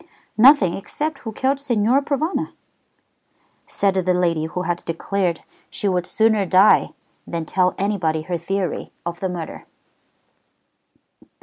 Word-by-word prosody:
"Nothing 230 - +6
except 300 - -4
who 225 - -6
killed 265 +5 0
Signor 245 -1 +2
Provana," 300 +5 -2 1.1
said 200 -1 +1
the 185 -1 +1
lady 170 -3 +1
who 180 +3 -4
had 175 -1 -2
declared 175 +1 -2 0.3
she 205 - -3
would 180 -2 0
sooner 220 -2 +2
die 190 +2 +5 0.4
than 165 -1 -4
tell 180 +2 +1
anybody 180 -6 -1
her 175 +1 -3
theory 185 0 -3
of 170 0 -4
the 190 - -2
murder. 175 -3 -7
190 Hz, 125 wpm, -21 LUFS, 175-220 Hz, 1.1 s, Nothing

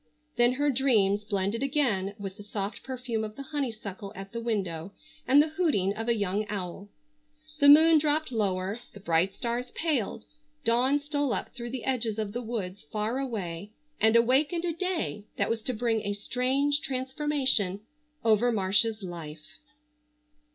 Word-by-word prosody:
Then 240 +1 +4
her 290 +2 +1
dreams 215 -6 +2
blended 200 +2 -1
again 240 -9 0
with 195 -2 -6
the 210 - -11
soft 205 0 -4
perfume 250 -4 -3
of 215 0 -6
the 275 - -7
honeysuckle 220 -9 -4
at 195 0 -8
the 230 - -4
window, 195 -6 -2 0.3
and 275 +2 +7
the 315 - -3
hooting 300 - +1
of 225 +2 -5
a 235 - +3
young 205 0 0
owl. 200 0 -5 0.7
The 285 - +7
moon 315 +2 +8
dropped 300 -1 0
lower, 200 -1 -1
the 205 - -10
bright 180 +1 +1
stars 240 +2 -2
paled, 270 -9 -1 0.4
dawn 250 +5 +3
stole 290 -2 -1
up - - -4
through 240 0 -6
the 250 -1 -5
edges 235 -5 -1
of 210 -2 -3
the 245 - -3
woods 205 -6 -4
far 215 +4 -1
away 205 -6 -4 0.3
and 220 +1 +4
awakened 280 +9 +3
a 340 - 0
day 335 - -2
that - - +1
was 230 -1 -1
to 255 - -1
bring 225 -1 0
a 205 - -2
strange 265 +7 0
transformation 260 -7 0 0.4
over 225 +2 +4
Marcia's 215 +1 +2
life. 160 -4 -9
230 Hz, 160 wpm, -28 LUFS, 200-265 Hz, 0.7 s, moon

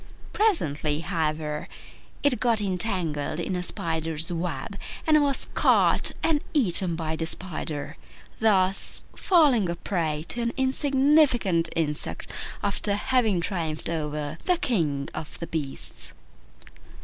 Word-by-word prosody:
Presently, 155 - +1
however, 155 -3 -2 0.6
it 285 -4 +2
got 235 -3 +2
entangled 180 -7 -1
in 185 +2 -2
a 180 - -2
spider's 160 -2 0
web, 175 +4 -4 0.3
and 310 -1 +5
was 280 -2 +1
caught - - +3
and 310 -3 +1
eaten 185 - +4
by 160 -1 -3
the 160 0 -1
spider, 160 -5 0 0.4
thus 195 -3 +2
falling 280 - +3
a 170 - -2
prey 160 -4 -2
to 240 - -1
an 235 0 -1
insignificant 265 - +2
insect 150 -2 -3 0.3
after 200 +1 0
having 220 -4 +1
triumphed 165 -4 -3
over 150 -1 -3
the 360 -1 +3
King 150 - 0
of 155 - -7
the 170 - -5
Beasts. 150 -5 -6
175 Hz, 120 wpm, -26 LUFS, 160-235 Hz, 0.6 s, and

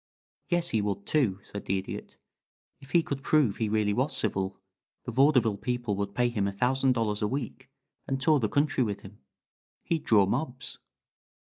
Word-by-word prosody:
"Yes 175 -1 +1
he 110 - +1
would, 100 -1 -3
too," 125 -11 +2
said 100 - -8
the 95 - 0
Idiot. 95 - -7 0.6
"If 135 -2 -15
he 170 +1 +4
could 140 -3 -4
prove 135 -9 +2
he 110 -2 -1
really 105 -1 +1
was 130 +7 0
civil, 95 -3 -1 0.4
the 120 - -5
vaudeville 125 -5 +4
people 120 -2 -2
would 100 0 -3
pay 120 0 +2
him 105 -4 -1
a - - -1
thousand 130 +5 +2
dollars 110 -4 -1
a 105 - +2
week 130 +1 -5 0.4
and 135 0 -1
tour 150 +2 +4
the 110 -4 0
country 140 +2 +2
with 105 -3 -3
him. 100 +1 -13 0.6
He'd 165 -2 -1
draw 105 -3 +5
mobs." 125 +5 -3
120 Hz, 180 wpm, -28 LUFS, 100-135 Hz, 0.6 s, draw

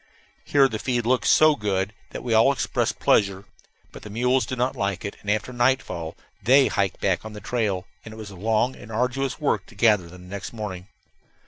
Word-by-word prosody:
Here 140 -2 +4
the 110 -4 -5
feed 120 -2 -1
looked 125 +1 +2
so 155 -1 +6
good 100 -2 -1 0.2
that - - -7
we 120 -2 -1
all 110 +5 +6
expressed 140 - -1
pleasure. 100 -1 +2 0.5
But - - -11
the 105 - -10
mules 125 +2 +1
did 130 -1 -4
not 125 +2 0
like 100 -2 -2
it, 100 - -5
and 100 - -6
after 110 +4 -1
nightfall 120 -10 0 0.3
they 135 +3 +5
hiked 100 -2 -1
back 95 -3 0
on 110 -1 -8
the 105 - -8
trail, 100 -4 -1 0.2
and 110 - -10
it 110 - -11
was 105 -2 -8
a - - -11
long 110 +6 0
and 110 - -12
arduous 125 +5 -1
work 150 - 0
to 115 - -16
gather 105 -5 +3
them 90 +1 -13
next 100 +4 -7
morning. 100 -5 -6
110 Hz, 210 wpm, -24 LUFS, 100-125 Hz, 0.5 s, so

